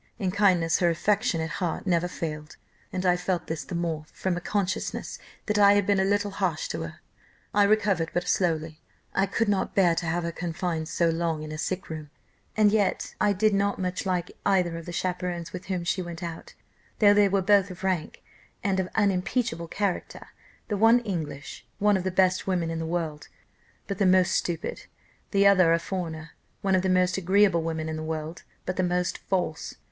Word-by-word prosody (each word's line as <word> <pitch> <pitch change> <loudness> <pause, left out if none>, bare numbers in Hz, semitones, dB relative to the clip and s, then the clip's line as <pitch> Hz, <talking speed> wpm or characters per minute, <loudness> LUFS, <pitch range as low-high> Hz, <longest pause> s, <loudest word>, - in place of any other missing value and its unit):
In 190 -5 -1
kindness 180 -5 +3
her 175 - +3
affectionate 170 -2 0
heart 175 +1 -2
never 175 -2 +2
failed, 150 -3 -6 0.3
and 185 0 -3
I 180 -1 +4
felt 180 0 -2
this 160 -1 -4
the 180 - -6
more, 165 -3 -2
from 185 -2 -2
a 175 - -4
consciousness 200 +1 -2 0.3
that 210 -1 +1
I 200 0 +7
had 205 -1 +2
been 200 -1 +2
a - - +3
little 205 +1 +1
harsh - - -1
to - - -3
her. - - -7 0.5
I 205 -1 +5
recovered 200 -5 +2
but 175 0 -2
slowly; 160 -4 0 0.3
I 195 +1 +2
could 220 +3 0
not 200 -2 0
bear 180 -4 +5
to 170 0 -2
have 170 +2 0
her 170 - -2
confined 170 -1 -3
so 170 0 +2
long 165 -2 -1
in 155 - -7
a 155 - -5
sick 185 +3 -3
room, 155 -2 -7 0.5
and 210 -1 +5
yet 205 -2 0
I 205 - +4
did 210 +2 +2
not 200 0 +1
much 185 -1 -2
like 180 -2 -1
either 185 -4 +2
of 165 0 -8
the - - -4
chaperons 175 -1 -3
with 180 0 -7
whom 185 -3 -2
she 180 +2 0
went 175 0 -7
out, 165 -1 -7 0.4
though 205 -2 +6
they 205 -1 +5
were 195 0 +1
both 200 0 +4
of 185 0 -10
rank, 185 -5 -2 0.4
and 195 -2 +1
of 185 -1 -1
unimpeachable 200 -1 0
character 195 +1 -3 0.4
the 210 - -1
one 225 +3 +5
English, 160 -9 -5
one 210 0 +3
of 190 - -1
the 190 - 0
best 185 0 +2
women 175 -3 0
in 165 - -3
the 160 - -3
world, 160 -3 -3 0.6
but 200 -2 -5
the 200 - +4
most 185 -1 +4
stupid; 170 -1 -2 0.4
the 200 -1 +3
other 185 -4 +6
a - - +4
foreigner, 165 -3 -5 0.3
one 195 -1 +2
of 185 - +4
the 190 - 0
most 185 0 +2
agreeable 190 -1 +3
women 160 -1 -3
in 160 0 -3
the - - -4
world, 160 +1 -4 0.2
but 185 - -3
the - - +2
most 180 0 0
false. 180 -5 -2
180 Hz, 205 wpm, -26 LUFS, 165-195 Hz, 0.6 s, I